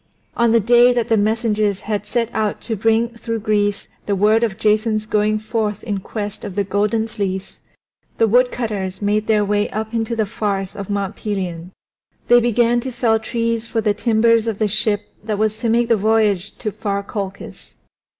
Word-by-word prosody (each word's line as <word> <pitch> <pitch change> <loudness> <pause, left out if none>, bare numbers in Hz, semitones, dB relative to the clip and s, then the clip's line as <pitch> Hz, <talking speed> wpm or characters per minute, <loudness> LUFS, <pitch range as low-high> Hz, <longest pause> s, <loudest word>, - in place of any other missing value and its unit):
On 235 -1 +3
the 230 - +5
day 240 +3 +5
that 240 -2 -1
the 225 - +4
messengers 215 -2 +1
had 210 -1 -3
set 235 +1 -1
out 215 -1 -1
to 225 - -3
bring 225 +2 +2
through 230 -1 -5
Greece 205 -1 0 0.2
the 200 - +1
word 215 +4 +3
of 205 -4 -1
Jason's 215 0 +1
going 215 0 +1
forth 215 -1 -2
in 205 -4 -2
quest 205 +1 -6
of 185 - -6
the 205 - +1
Golden 210 +3 0
Fleece 195 -4 -4 0.6
the 225 - +4
woodcutters 220 -5 0
made 210 +1 0
their 210 -2 +3
way 205 0 0
up 220 +1 -4
into 230 0 -1
the 220 -1 +1
forests 195 -2 -3
of 200 -1 -7
Mount 200 0 -2
Pelion; 180 -4 -4 0.6
they 240 0 +7
began 240 0 +2
to 260 +2 -5
fell 230 -2 +1
trees 230 0 -2
for 230 - -1
the 210 -1 +1
timbers 230 +1 +2
of 220 -3 -1
the 215 - +1
ship 210 0 +1 0.2
that 215 -1 -2
was 215 0 0
to 230 - -1
make 235 +1 +2
the 230 -1 +3
voyage 210 -2 +1
to 215 - -3
far 200 0 -3
Colchis. 195 -1 -7
215 Hz, 190 wpm, -20 LUFS, 205-230 Hz, 0.6 s, they